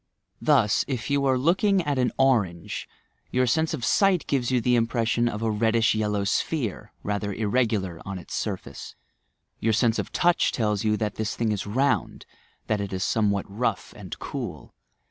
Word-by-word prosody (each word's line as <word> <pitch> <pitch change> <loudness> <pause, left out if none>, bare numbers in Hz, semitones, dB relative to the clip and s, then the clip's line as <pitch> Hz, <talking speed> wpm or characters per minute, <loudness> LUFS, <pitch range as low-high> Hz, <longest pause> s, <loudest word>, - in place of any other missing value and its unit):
Thus, 100 - +3
if 130 -1 -3
yon 140 -1 +2
are 130 -1 +3
looking 185 +7 +2
at 145 -4 -1
an 125 -1 +2
orange, 105 -11 +1 0.4
your 125 0 +2
sense 160 +6 +1
of 120 - -4
sight 195 +1 +3
gives 130 -4 0
you 130 -1 +2
the 125 +1 +2
impression 115 0 +1
of 105 0 -5
a 110 - +1
reddish 115 +2 +2
yellow 105 -2 0
sphere, 105 - -2
rather 100 0 -2
irregu 110 +2 +1
lar 90 -4 -7
on 95 0 -5
its 90 - -10
surface. - - -5 0.6
Your 110 0 +1
sense 115 0 +2
of - - -4
touch 175 0 +2
tells 105 -4 0
you 105 -1 +2
that 105 -2 -3
this 110 -1 -2
thing 115 -2 0
is 100 -1 -3
round, 135 +6 0 0.4
that 105 -2 0
it 100 - -4
is 95 -1 -2
somewhat 100 -2 +1
rough 105 0 -2
and 95 -4 -8
cool. 115 - -6
115 Hz, 180 wpm, -25 LUFS, 105-130 Hz, 0.6 s, Thus